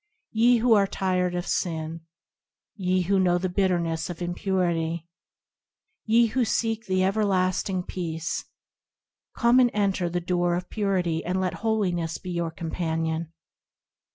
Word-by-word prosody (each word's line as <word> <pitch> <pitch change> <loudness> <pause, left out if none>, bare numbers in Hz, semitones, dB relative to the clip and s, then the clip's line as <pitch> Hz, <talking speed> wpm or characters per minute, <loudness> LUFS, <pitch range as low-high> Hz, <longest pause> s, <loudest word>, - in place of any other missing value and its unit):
Ye 235 +2 +4
who 235 0 +4
are 200 -2 +4
tired 185 -2 0
of 175 0 -2
sin; 160 -1 -2 0.7
Ye 185 -2 +1
who 195 +2 +2
know 180 -1 +3
the 185 +1 -1
bitterness 175 -4 0
of 175 - -6
impurity; 175 -2 -1 1.0
Ye 230 +2 +5
who 245 +3 +1
seek 225 0 -1
the 185 0 +2
everlasting 190 -2 +1
peace, 165 -3 -4 0.9
Come 235 +2 +5
and 250 -1 +5
enter 195 -4 +1
the 175 +1 -1
door 175 0 0
of 180 +1 -5
Purity 185 -6 0
And 180 +2 -1
let 185 -2 0
Holiness 180 -8 0
be 185 - -7
your 170 -1 -1
companion. 160 0 -3
180 Hz, 135 wpm, -26 LUFS, 170-200 Hz, 1.0 s, Ye